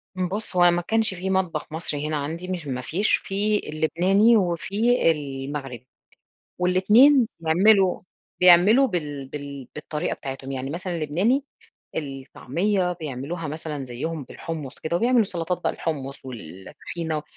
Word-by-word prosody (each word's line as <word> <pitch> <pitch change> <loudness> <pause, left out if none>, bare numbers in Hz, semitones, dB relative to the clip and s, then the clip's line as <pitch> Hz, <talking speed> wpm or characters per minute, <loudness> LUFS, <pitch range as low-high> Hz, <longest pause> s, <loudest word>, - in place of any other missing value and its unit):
م 185 -1 -1
بُصّ، 205 +1 -4
هو 175 -1 +6
ما 175 - 0
كانش 220 +3 +1
في 185 +1 -4
مطبخ 185 -5 -1
مصري 150 -2 -3
هنا 155 - -1
عندي 160 +5 -4
مش 180 -5 -4
ما 125 -2 -3
فيش، 180 - 0
في 210 +2 0
اللبناني 185 +9 +3
وفي 200 +3 +2
المغربي، 135 -3 -5 0.7
والإتنين 215 +9 +5
بيعملوا 185 +4 +4 0.4
بيعملوا 185 +9 +7
بال 145 - -4
بال 140 -2 -7
بالطريقة 150 +2 -3
بتاعتهُم، 135 0 -7
يعني 135 +1 -4
مثلًا 175 +1 -4
اللبناني 185 - +1 0.5
الطعميّة 165 +7 -2
بيعملوها 155 +1 -5
مثلًا 150 -2 -5
زيُّهم 140 +5 -4
بالحُمُّص 150 -1 -7
كده، 165 +2 -2
وبيعملوا 240 +1 +3
سلطات 175 -1 -3
بقى - - +2
الحُمُّص 140 -4 -5
والطحينة، 130 - -6
165 Hz, 130 wpm, -24 LUFS, 145-190 Hz, 0.7 s, بيعملوا